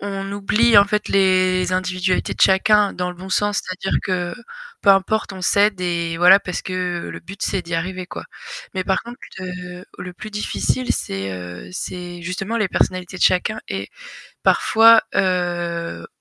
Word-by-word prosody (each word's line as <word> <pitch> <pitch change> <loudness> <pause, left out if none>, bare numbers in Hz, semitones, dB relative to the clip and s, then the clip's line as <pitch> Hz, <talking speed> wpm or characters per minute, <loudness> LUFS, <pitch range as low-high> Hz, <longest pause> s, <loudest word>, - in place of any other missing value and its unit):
on 195 -1 -4
oublie 210 +3 +3
en 200 - +7
fait 210 +1 -2
les 185 -1 +2
individualités 185 0 0
de - - -13
chacun 205 +1 +4
dans 180 0 -2
le 180 - -11
bon 190 +1 -9
sens, 205 +1 +1
c'est-à-dire 185 +1 -2
que, 180 0 -2 0.5
peu 200 - +6
importe, 195 +2 +2
on 190 - -8
s'aide 200 +1 +2
et 170 -2 -2
voilà, 180 +3 +8
parce 180 -2 -5
que 180 -2 -3
le - - -7
but, 190 +3 -11
c'est 190 -2 -1
d'y 170 0 -5
arriver, 185 +2 -3
quoi. - - -8 0.5
Mais 185 -1 -2
par 190 - 0
contre, 240 +1 -10 0.2
heu, 180 0 -7
le 180 0 -7
plus 215 +4 -9
difficile, 225 +4 -1
c'est, 95 0 -4
heu, 90 - -8
c'est 175 -1 -6
justement 195 +6 -3
les 210 -3 +1
personnalités 185 +1 -1
de - - -3
chacun 200 +4 +2
et 95 +1 -4 0.5
parfois, 225 0 +6
heu, 175 - -1
185 Hz, 170 wpm, -20 LUFS, 180-200 Hz, 0.5 s, voilà